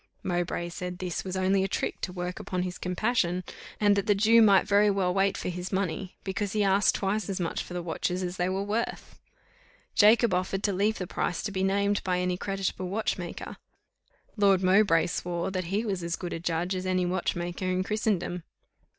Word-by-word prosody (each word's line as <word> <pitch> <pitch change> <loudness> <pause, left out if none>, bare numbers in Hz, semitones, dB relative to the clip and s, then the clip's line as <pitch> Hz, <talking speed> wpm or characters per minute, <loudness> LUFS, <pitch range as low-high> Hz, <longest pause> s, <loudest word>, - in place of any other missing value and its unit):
Mowbray 175 -1 -1
said 180 0 -5
this 180 -2 -3
was 190 0 -4
only 190 +1 +2
a - - +1
trick - - -3
to 180 - -3
work 180 0 -4
upon 180 -1 -2
his 180 0 -5
compassion, 180 -1 0 0.4
and 205 -1 +4
that 200 +2 -1
the 205 - +4
Jew 225 +3 +5
might 200 -3 +5
very 205 0 +4
well 190 -3 +1
wait 195 +1 +2
for - - -3
his 180 +1 -5
money, 190 -1 -2
because 200 +1 -2
he 210 -1 +2
asked 195 +1 +3
twice 205 +2 -1
as 190 - -2
much 170 -2 -2
for 180 - -8
the 175 - -3
watches 180 +2 -2
as 180 0 -4
they 180 +1 0
were 190 +1 -1
worth. 215 +3 -3 0.7
Jacob 225 0 +5
offered 185 +2 -1
to 200 - +1
leave 205 +4 +1
the 185 - -3
price 175 - -2
to 210 - -3
be 190 -1 -2
named 200 +1 +1
by 180 -1 0
any 180 0 0
creditable 190 -1 -3
watchmaker. 195 -4 -3 0.8
Lord 195 -2 +4
Mowbray 185 -3 +4
swore 175 +1 -2
that 185 -1 -2
he 200 +6 -1
was 195 -4 -2
as 170 0 -2
good 175 - -5
a - - -4
judge 170 +2 -1
as 185 0 -3
any 185 -1 +1
watchmaker 175 0 -2
in 185 0 0
Christendom. 205 -4 -1
185 Hz, 200 wpm, -28 LUFS, 180-200 Hz, 0.8 s, Jew